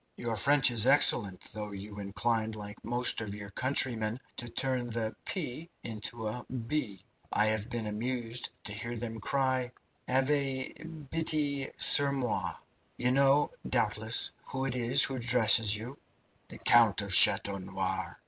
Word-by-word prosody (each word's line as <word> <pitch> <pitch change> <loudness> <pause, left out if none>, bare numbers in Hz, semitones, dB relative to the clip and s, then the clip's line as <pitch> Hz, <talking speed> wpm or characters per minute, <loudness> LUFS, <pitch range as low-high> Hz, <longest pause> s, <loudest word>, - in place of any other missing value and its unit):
"Your 115 -1 -4
French 135 +5 +3
is 115 0 +4
excellent, 105 -9 +4
though 105 0 -7
you 100 +1 -10
incline, 110 +3 -2
like 105 -1 -10
most 120 0 +1
of 105 -2 -6
your 105 0 -10
countrymen, 120 -2 +1 0.2
to 120 - -3
turn 125 0 -2
the 110 -1 -4
'p' 160 -2 -5
into 110 0 -5
a 120 +3 -6
'b.' 115 -5 -5 0.3
I 105 - +2
have 110 +1 -1
been 120 -2 -4
amused 120 +2 -4
to 105 - -4
hear 115 +3 -6
them 115 -1 -6
cry 130 +1 -1 0.4
'Avez 135 0 -1 0.4
bitie 150 -4 -2
sur 140 -1 +7
moi!' 125 -5 -3 0.4
You 125 +1 0
know, 140 +2 +2 0.2
doubtless, 110 -1 +1
who 130 0 -5
it 135 - -3
is 125 +2 +3
who 135 - +1
addresses 115 -3 +5
you." 120 +6 -9 0.5
"The - - -11
Count 110 -4 +4
of 100 -2 -4
Chateau 100 +2 +6
Noir." 95 0 -4
120 Hz, 150 wpm, -29 LUFS, 105-130 Hz, 0.5 s, sur